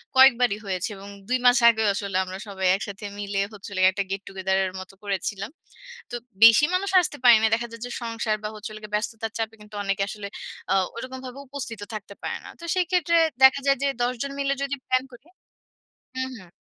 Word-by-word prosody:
কয়েকবারই 250 -5 +6
হয়েছে 185 +1 -2
এবং 195 +1 -10 0.2
২ 255 - +3
মাস 245 +1 +7
আগেও 220 -2 +2
আসলে 200 -1 -2
আমরা 185 0 -7
সবাই 190 -2 -1
একসাথে 200 +1 -6
মিলে 200 -1 -2
হচ্ছে 205 0 -10
হলো 185 - -3
গিয়ে 185 0 +6
একটা 200 +1 -1
গেট 195 0 -2
টু - - -8
গেদার 190 0 +1
এর - - -13
মত 185 0 -9
করেছিলাম। 200 +1 -3 0.6
তো - - -3 0.3
বেশি 230 +6 +9
মানুষ 390 +2 0
আসতে 300 -3 -3
পারে 240 -2 +9
নাই। 220 - +4
দেখা 235 +1 -4
যায় 230 - -10
যে 245 - -7
সংসার 230 -2 -1
বা 210 - -2
হচ্ছে 215 +1 -7
হলো 215 - -8
গিয়ে 210 0 -10
ব্যস্ততার 225 +1 -3
চাপে 225 0 -2
কিন্তু 210 0 -16
অনেকে 195 0 0
আসলে 210 -1 -6 0.5
আ - - +4 0.2
ওরকমভাবে 260 +1 -7
উপস্থিত 260 -4 -5
ও - - -30
থাকতে 205 -1 -8
পারে - - -2
না। - - -9
তো - - -7
সেক্ষেত্রে 360 -2 +1 0.4
দেখা 265 +1 +8
যায় 275 - +4
যে - - +3 0.2
১০ 245 +1 +1
জন 280 - -4
মিলে 275 0 +1
যদি 280 0 -2
প্লান 255 0 +2
করি 245 +3 -15 0.9
হু, 260 - -1
হু। 185 -5 -14
220 Hz, 215 wpm, -25 LUFS, 200-255 Hz, 0.9 s, বেশি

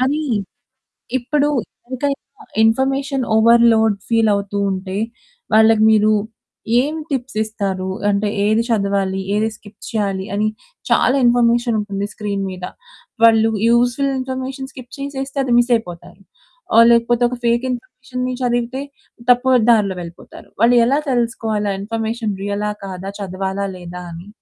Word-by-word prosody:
కానీ 285 +4 +1 1.0
ఇప్పుడు 285 +4 0 0.4
ఇంక 255 +2 -6 0.2
ఇంకా 275 -1 -20 0.2
ఇన్ఫర్మేషన్ 270 +3 +1
ఓవర్‌లోడ్ 225 -1 +5
ఫీల్ 225 -1 +3
అవుతూ 200 0 -2
ఉంటే. 190 +1 -4 0.6
వాళ్ళకి 220 0 +5
మీరు 215 0 +4 0.7
ఏం 295 +3 -2
టిప్స్ 260 -5 -3
ఇస్తారు? 195 -4 -3 0.2
అంటే 205 +1 +1 0.2
ఏది 215 +2 +3
చదవాలి? 200 -3 0 0.2
ఏది 215 +1 +1
స్కిప్ 205 0 -17
చేయాలి 200 -4 -2
అని? 215 +1 +1 0.4
చాలా 260 - +3
ఇన్ఫర్మేషన్ 240 0 +3
ఉంటుంది 200 -1 -3
స్క్రీన్ 200 -2 -3
మీద. 180 -1 -6 0.6
వాళ్ళు 225 -1 +5 0.2
యూజ్ఫుల్ 245 +4 +2
ఇన్ఫర్మేషన్ 260 +1 -5
స్కిప్ 250 -1 -11
చేసేస్తే 275 0 -5
అది 250 - 0
మిస్ 240 +1 +3
అయిపోతారు. 180 -2 -7 0.5
ఆహ్, 230 - +8
లేకపోతే 235 +1 +3
ఒక 250 - -5
ఫేక్ 235 +2 +2
ఇన్ఫర్మేషన్‌‌ని 255 -2 -5
చదివితే 245 +2 -1 0.5
తప్పు 255 +1 +4
దారిలో 200 -5 +2
వెళ్ళిపోతారు. 170 0 -12
వాళ్ళు 240 +1 +5
ఎలా 275 +5 +2
తెలుసుకోవాలి 225 -4 -1
ఆ - - -3
ఇన్ఫర్మేషన్ 225 +1 -3
రియలా 205 +1 -2
కాదా? 190 0 -6
చదవాలా? 190 0 -3
లేదా 180 0 -8
అని? 170 +3 -10
225 Hz, 130 wpm, -19 LUFS, 200-250 Hz, 1.0 s, ఆహ్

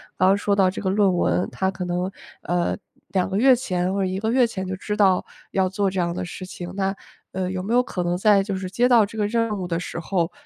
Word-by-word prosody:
刚 185 - +4
刚 195 - +4
说 205 0 +1
到 190 -2 +4
这 185 - -5
个 190 - 0
论 195 -1 +3
文， 180 - +1
它 190 - 0
可 190 -1 -5
能， 180 +1 -1 0.3
呃， 175 0 0 0.3
2 185 -1 0
个 195 - -1
月 260 +4 +6
前 185 -7 -1
或 200 - -1
者 195 - +1
1 185 +1 -2
个 220 +2 -1
月 250 -1 +4
前 190 -4 -5
就 185 - -4
知 210 +2 -3
道 195 -3 +3 0.3
要 190 -1 +2
做 195 +1 0
这 190 - -2
样 170 -1 0
的 - - -3
事 185 +1 -7
情。 180 -1 -7
那， 195 0 0 0.4
呃， 185 -1 -2
有 185 -1 -3
没 205 +5 -2
有 250 +1 +5
可 180 -7 -3
能 175 0 0
在 205 +1 +4
就 195 0 -3
是 185 -1 -4
接 240 +6 +2
到 235 -4 +5
这 220 +2 -10
个 210 -1 +1
任 230 -2 0
务 180 - -3
的 170 -1 -1
时 175 - -5
候， 170 0 -1
190 Hz, 280 characters per minute, -23 LUFS, 185-205 Hz, 0.4 s, 月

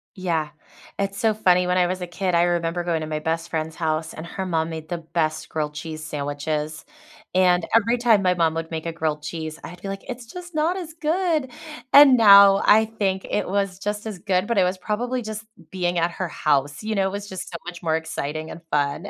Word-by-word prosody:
Yeah. 165 -5 -1 0.5
It's 200 0 -2
so 220 -1 +3
funny, 180 -4 +3
when 180 - +1
I 180 -1 +4
was 185 +1 -3
a 180 - -4
kid, 180 0 -1
I 170 - +4
remember 175 0 0
going 170 -2 -1
to 155 - -4
my 155 0 -2
best 165 +2 -2
friend's 160 0 -3
house, 160 -1 -2
and 160 - -8
her 190 +3 -5
mom 165 -3 0
made 160 -1 -7
the 175 - -2
best 160 -1 -2
grilled 150 -1 -2
cheese 155 +1 -7
sandwiches, 150 +1 -3 0.5
and 180 -2 +4
every 230 +2 +3
time 230 -4 +4
my 180 -1 +3
mom 165 -2 +2
would 165 0 -4
make 160 0 -4
a 165 - -2
grilled 155 -2 -2
cheese, 160 0 -5
I'd 175 +1 -10
be - - -6
like, 195 0 -5
"It's 245 -1 -6
just 350 +7 -10
not 320 +4 +1
as 335 -4 -7
good." 320 -4 0 0.4
And 280 -3 +9
now, 200 -2 +8
I 220 +1 +6
think 195 -4 -2
it 210 - -1
was 195 -1 -1
just 210 +2 -3
as 205 -4 -6
good, 185 0 0
but 235 - 0
it 190 - +5
was 180 +1 0
probably 245 +6 -2
just 220 0 -6 0.3
being 180 -2 -1
at 170 +1 +1
her 185 +1 -3
house, 145 0 0
you 220 0 -2
know, 195 - +2
it - - -3
was 200 +1 -6
just 190 - -6
so 170 - -5
much 175 0 -8
more 160 -1 +1
exciting 155 -1 -4
and 165 - -9
fun. 145 -1 0
180 Hz, 230 wpm, -23 LUFS, 160-205 Hz, 0.5 s, And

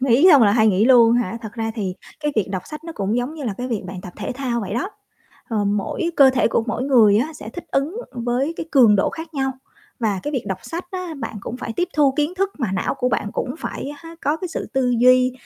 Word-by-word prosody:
Nghỉ 260 +5 +4
xong 285 -5 +7
là 205 -2 +5
hay 220 0 +4
nghỉ 200 0 +3
luôn 235 -2 +6
hả? 235 -2 0
Thật 220 -2 -7
ra 225 -1 -3
thì 195 -5 -3 0.3
cái 295 -1 -1
việc 205 -3 +1
đọc 185 -2 -3
sách 305 +1 -9
nó 330 - -6
cũng 200 +3 -1
giống 245 +5 -2
như 305 -3 -7
là 225 - -1
cái 250 +1 -3
việc 225 -5 -2
bạn 185 0 -7
tập 180 - -10
thể - - -4
thao 250 -3 -2
vậy 200 -1 -4
đó, 265 - -2 0.6
ờ, 215 -3 0
mỗi 205 - -1
cơ 270 -2 +8
thể 255 -2 +2
của 230 - +1
mỗi 240 +2 -2
người 230 -7 +5
á 295 +8 -1
sẽ 300 - -9
thích 350 - -8
ứng 290 +9 0 0.2
với 250 +5 -1
cái 325 - -5
cường 235 -7 +6
độ - - +2
khác 320 0 -8
nhau. 270 -1 0 0.5
Và 210 -5 0
cái 295 - -3
việc 260 -5 -2
đọc 190 -1 -3
sách 340 +2 -5
á 365 -3 -5
bạn - - -5
cũng 230 - -6
phải 240 -2 -5
tiếp 355 - 0
thu 285 -3 +4
kiến 300 +3 0
thức 390 +1 0
mà 220 -6 -1
não 190 - -1
của 250 - 0
bạn 215 -3 -1
cũng 250 - -3
phải, 280 - -5
há, 330 +3 -11
có 295 +2 +1
cái 365 +2 -5
sự 330 - -4
tư 260 -2 +1
duy 255 +1 +5
250 Hz, 270 wpm, -21 LUFS, 220-295 Hz, 0.6 s, cơ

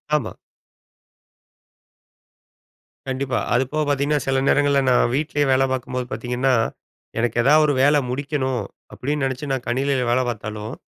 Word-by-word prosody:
ஆமா. 130 -7 -2 2.7
கண்டிப்பா. 130 -1 -1
அது 125 +2 +3
போக 155 - +1
பார்த்தீங்கன்னா, 145 +1 +1
சில 135 0 +2
நேரங்கள்ல 145 -1 +3
நான் 120 -1 +3
வீட்லயே 145 0 0
வேலை 130 0 +4
பார்க்கும்போது 125 -1 -3
பார்த்தீங்கன்னா, 125 +3 0 0.7
"எனக்கு 120 0 -1
ஏதாவது 150 +4 +5
ஒரு 145 - +2
வேலை 145 +2 +5
முடிக்கணும்." 130 -2 -2 0.3
அப்படீன்னு 145 +1 -2
நெனைச்சு 135 +2 -4
நா 135 - +1
கணினில 130 +1 0
வேலை 130 +1 +2
பார்த்தாலும், 105 +1 -5
135 Hz, 125 wpm, -22 LUFS, 125-145 Hz, 2.7 s, ஏதாவது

